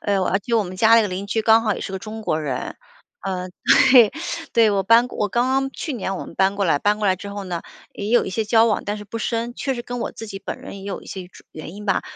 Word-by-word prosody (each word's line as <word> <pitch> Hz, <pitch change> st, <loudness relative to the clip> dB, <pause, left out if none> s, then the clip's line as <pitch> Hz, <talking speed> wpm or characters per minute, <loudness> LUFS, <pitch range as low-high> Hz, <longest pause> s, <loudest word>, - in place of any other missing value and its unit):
哎 205 Hz, -, -1 dB
哟， 190 Hz, -1 st, +1 dB
啊， 195 Hz, -, +1 dB
就 230 Hz, +3 st, 0 dB
我 215 Hz, -, 0 dB
们 185 Hz, 0 st, -8 dB
家 225 Hz, +3 st, +6 dB
那 230 Hz, -, +5 dB
个 210 Hz, -, 0 dB
邻 185 Hz, +2 st, -4 dB
居 220 Hz, +2 st, 0 dB
刚 225 Hz, +1 st, +5 dB
好 215 Hz, -, +1 dB
也 -, -, -7 dB
是 -, -, -5 dB
个 190 Hz, -, -3 dB
中 220 Hz, +2 st, -7 dB
国 160 Hz, -7 st, -1 dB
人。 135 Hz, -5 st, -4 dB, 0.5 s
嗯， 185 Hz, -1 st, -4 dB, 0.4 s
对， 240 Hz, -5 st, +8 dB, 0.4 s
对， 225 Hz, -2 st, +5 dB
我 200 Hz, -1 st, +1 dB
搬 230 Hz, +5 st, +5 dB
我 210 Hz, -4 st, -2 dB
刚 240 Hz, +5 st, +1 dB
刚 270 Hz, +1 st, +1 dB
去 300 Hz, +3 st, -5 dB
年 195 Hz, -5 st, -3 dB
我 -, -, -6 dB
们 -, -, -12 dB
搬 195 Hz, +1 st, +2 dB
过 200 Hz, -, 0 dB
来。 160 Hz, -5 st, +2 dB
搬 210 Hz, +1 st, +2 dB
过 210 Hz, -, 0 dB
来 190 Hz, -, +4 dB
之 200 Hz, +2 st, -9 dB
后 200 Hz, 0 st, -6 dB
呢， 175 Hz, -3 st, -4 dB, 0.3 s
也 205 Hz, -, -5 dB
有 240 Hz, +2 st, +4 dB
一 -, -, -5 dB
些 220 Hz, +3 st, -1 dB
交 225 Hz, +1 st, +4 dB
往， 225 Hz, -2 st, +1 dB
但 205 Hz, +1 st, -2 dB
是 210 Hz, -, -9 dB
不 230 Hz, +3 st, -6 dB
深。 235 Hz, +1 st, -2 dB
确 270 Hz, -, -2 dB
实 240 Hz, -, -5 dB
跟 245 Hz, 0 st, -5 dB
我 -, -, -2 dB
自 225 Hz, -, -9 dB
己 195 Hz, -2 st, -7 dB
本 -, -, -5 dB
人 200 Hz, -, -9 dB
也 -, -, -11 dB
有 200 Hz, 0 st, -5 dB
一 -, -, -15 dB
些 185 Hz, -2 st, -7 dB
种 -, -, -18 dB
原 155 Hz, +1 st, -8 dB
因 210 Hz, -, -9 dB
吧， 195 Hz, -, +1 dB
210 Hz, 325 characters per minute, -22 LUFS, 190-230 Hz, 0.5 s, 对